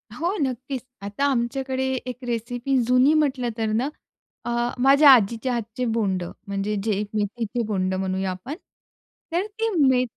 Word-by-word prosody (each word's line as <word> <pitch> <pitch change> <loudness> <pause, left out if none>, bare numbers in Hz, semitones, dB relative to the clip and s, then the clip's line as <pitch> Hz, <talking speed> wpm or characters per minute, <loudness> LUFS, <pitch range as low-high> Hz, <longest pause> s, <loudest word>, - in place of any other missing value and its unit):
हो, 345 +9 -1
नक्कीच. 260 0 -2 0.2
आता 205 +8 -2
आमच्याकडे 260 +2 -1 0.2
एक 250 -1 -5
रेसिपी 245 +3 -1
जुनी 255 +4 +5
म्हटलं 275 -5 +1
तर 225 - 0
ना, 245 +6 0 0.6
अ, - - -3 0.3
माझ्या 280 +2 +7
आजीच्या 235 +1 +4
हातचे 230 +1 -3
बोंडं 190 -6 -1
म्हणजे 200 +1 -2
जे 210 -2 0
मेथीचे 220 +3 -2
बोंडं 190 -3 -1
म्हणूया 190 0 -1
आपण, 185 +10 -6 0.8
तर 355 +4 0
ती 445 +2 -2 0.2
मे 255 -1 +4
240 Hz, 140 wpm, -24 LUFS, 210-270 Hz, 0.8 s, माझ्या